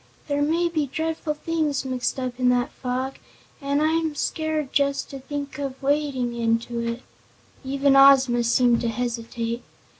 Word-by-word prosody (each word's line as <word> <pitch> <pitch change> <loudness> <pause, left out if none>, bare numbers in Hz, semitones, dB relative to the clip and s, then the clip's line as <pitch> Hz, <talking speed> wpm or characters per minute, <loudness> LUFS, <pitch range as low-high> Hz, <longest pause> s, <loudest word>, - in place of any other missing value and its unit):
"There 285 -1 0
may 330 +4 +2
be 310 -4 -1
dreadful 315 +1 -2
things 300 -3 -1
mixed 255 0 -2
up 255 -1 -4
in 250 -1 +3
that 250 +3 +1
fog, 260 +1 -4 0.4
an' 280 +1 0
I'm 320 0 +1
scared 310 -2 -2
just 280 0 +1
to 275 - -7
think 285 +1 -6
of 270 -2 -4
wading 275 -3 0
into 235 0 -1
it." 235 +1 -3 0.6
Even 275 +1 +2
Ozma 270 -3 +6
seemed 240 0 +3
to 235 - -1
hesitate. 235 0 -3
270 Hz, 150 wpm, -24 LUFS, 245-295 Hz, 0.6 s, Ozma